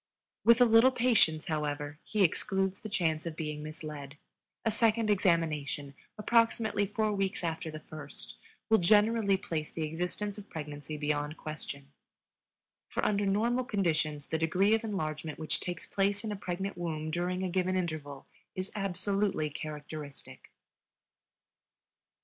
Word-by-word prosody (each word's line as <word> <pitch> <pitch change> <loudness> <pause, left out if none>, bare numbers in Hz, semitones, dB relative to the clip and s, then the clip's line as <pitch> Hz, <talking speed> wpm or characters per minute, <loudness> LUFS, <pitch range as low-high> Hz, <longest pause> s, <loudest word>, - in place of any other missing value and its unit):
With 235 +1 +7
a - - +9
little 225 +2 +7
patience, 230 -11 +3
however, 150 -1 -2
he 210 -2 +1
excludes 190 +2 +1
the 215 - -7
chance 165 -5 0
of 165 - -4
being 150 -1 -4
misled; 150 -2 -7 0.5
a 225 - +3
second 225 0 +3
examination, 155 -7 +1 0.2
approximately 225 -1 +2
four 215 +1 0
weeks 195 -2 -1
after 165 -1 -2
the 155 0 -6
first, 150 -2 -7 0.3
will 220 -1 +5
generally 210 +2 +4
place 165 -6 -3
the 160 - -3
existence 180 +6 -3
of 205 - -12
pregnancy 150 -1 -6
beyond 150 +1 -1
question, 140 -2 -7 1.0
for - - -2
under 205 -1 +2
normal 235 +6 +2
conditions 160 - 0
the 160 - -2
degree 185 +6 +3
of 225 +1 +2
enlargement 155 -7 -3
which 155 -1 -1
takes 175 -1 -4
place 200 +1 +1
in 220 - -3
a - - -2
pregnant 190 0 -4
womb 155 -2 -2
during 180 +2 -1
a 185 - 0
given 185 0 +1
interval 155 -6 -3 0.3
is 185 +1 -4
absolutely 195 -4 0
characteristic. 150 -1 -7
175 Hz, 140 wpm, -31 LUFS, 155-205 Hz, 1.0 s, a